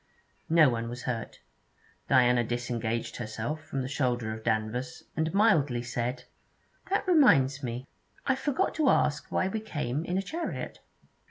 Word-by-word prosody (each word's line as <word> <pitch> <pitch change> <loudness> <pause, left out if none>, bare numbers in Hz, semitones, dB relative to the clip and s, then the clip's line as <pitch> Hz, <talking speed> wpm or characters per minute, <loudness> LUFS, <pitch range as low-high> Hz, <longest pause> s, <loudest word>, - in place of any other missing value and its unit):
No 160 -2 +6
one 115 -2 -1
was 120 +1 -7
hurt. 115 -3 -4 0.7
Diana 125 -2 +5
disengaged 120 -1 -2
herself 115 +7 -4
from 135 -3 -3
the - - -3
shoulder 125 -5 -1
of 110 0 -8
Danvers, 110 +3 -2
and 160 0 0
mildly 155 - +3
said: 120 +2 -3 0.7
'That 395 0 0
reminds 145 - +5
me, 125 0 -4 0.4
I 265 - +3
forgot 265 +1 0
to 305 -4 +4
ask 150 - +1
why 185 - +1
we 220 +3 -2
came 150 - -3
in 175 +2 -2
a 195 - 0
chariot.' 330 - -4
130 Hz, 150 wpm, -29 LUFS, 120-165 Hz, 0.7 s, No